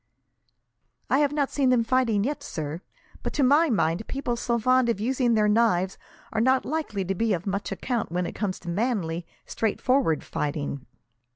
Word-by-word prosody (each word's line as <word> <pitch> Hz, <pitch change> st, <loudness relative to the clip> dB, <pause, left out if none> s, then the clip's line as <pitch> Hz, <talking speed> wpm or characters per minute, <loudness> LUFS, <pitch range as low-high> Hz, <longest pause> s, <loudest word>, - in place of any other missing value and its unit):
"I 270 Hz, -, +4 dB
have 290 Hz, -1 st, +3 dB
not 290 Hz, -2 st, 0 dB
seen 275 Hz, -3 st, +2 dB
them 250 Hz, -2 st, +4 dB
fighting 230 Hz, -4 st, +2 dB
yet, 285 Hz, +4 st, -2 dB
sir, 155 Hz, -, -5 dB, 0.4 s
but -, -, -4 dB
to 285 Hz, -, +1 dB
my 295 Hz, +5 st, +5 dB
mind 175 Hz, -2 st, 0 dB
people 270 Hz, -3 st, -2 dB
so 235 Hz, 0 st, 0 dB
fond 255 Hz, +1 st, +3 dB
of 230 Hz, -, 0 dB
using 245 Hz, +1 st, +1 dB
their 210 Hz, -1 st, +3 dB
knives 210 Hz, -4 st, +2 dB, 0.3 s
are 220 Hz, -, +1 dB
not 260 Hz, +2 st, +3 dB
likely 270 Hz, -11 st, -2 dB
to 195 Hz, -, -1 dB
be 220 Hz, +3 st, +1 dB
of 175 Hz, -1 st, -3 dB
much 200 Hz, 0 st, -2 dB
account, 240 Hz, -9 st, -2 dB
when 180 Hz, +1 st, -1 dB
it -, -, -5 dB
comes 200 Hz, -3 st, -2 dB
to 175 Hz, -, -7 dB
manly, 180 Hz, -5 st, -1 dB, 0.2 s
straightforward 225 Hz, -, +1 dB
fighting. 145 Hz, -2 st, -3 dB
225 Hz, 180 wpm, -26 LUFS, 185-255 Hz, 0.4 s, my